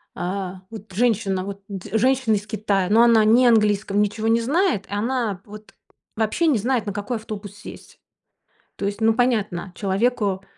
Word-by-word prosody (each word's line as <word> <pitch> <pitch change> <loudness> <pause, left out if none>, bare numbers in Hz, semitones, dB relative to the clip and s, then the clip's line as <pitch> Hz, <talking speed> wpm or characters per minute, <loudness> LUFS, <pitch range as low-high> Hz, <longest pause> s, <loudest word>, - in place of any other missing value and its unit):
а, 185 +1 -4
вот 215 -2 -10
женщина, 200 -4 +1
вот 200 0 -7
д 195 -3 -8
женщина 255 -1 +2
из 205 +1 -4
Китая. 200 -3 -1
Ну, 220 +3 +5
она 230 -2 +5
не 240 +4 +5
английском 210 -3 +2
ничего 210 +2 -1
не 230 +1 +3
знает. 295 - 0
И - - -17
она 220 -2 -1
вот 210 0 -13 0.4
вообще 225 +10 0
не 290 -6 +3
знает, 235 +2 0
на 205 - -2
какой 205 +4 -3
автобус 210 -2 -8
сесть. 205 - -12 0.8
То - - -4
есть, 200 +2 -3
ну, 225 0 +4
понятно, 215 -6 0
человеку, 200 -1 0
215 Hz, 170 wpm, -22 LUFS, 200-235 Hz, 0.8 s, Ну